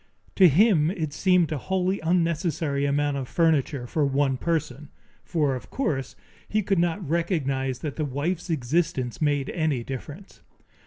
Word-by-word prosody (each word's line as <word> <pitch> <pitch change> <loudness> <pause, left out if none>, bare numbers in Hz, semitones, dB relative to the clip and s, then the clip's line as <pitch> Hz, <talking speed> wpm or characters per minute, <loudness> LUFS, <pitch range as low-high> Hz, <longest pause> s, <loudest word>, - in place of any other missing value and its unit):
To 190 - +8
him 165 - +4
it 160 -6 -3
seemed 180 0 +2
a 150 - -2
wholly 190 +4 -1
unnecessary 165 -3 0
amount 145 0 0
of 130 -2 -4
furniture 150 -6 +1
for 150 +5 -1
one 140 -1 +1
person, 150 -2 -2 0.3
for 150 -5 0
of 125 - -9
course 145 - -2 0.3
he 215 0 +1
could 195 -1 +1
not 175 +1 0
recognize 140 -6 -1
that 150 -3 -5
the 155 - -1
wife's 160 +7 -3
existence 150 -2 -1
made 145 -3 +1
any 155 -7 -1
difference. 145 +9 -8
155 Hz, 150 wpm, -25 LUFS, 140-170 Hz, 0.3 s, To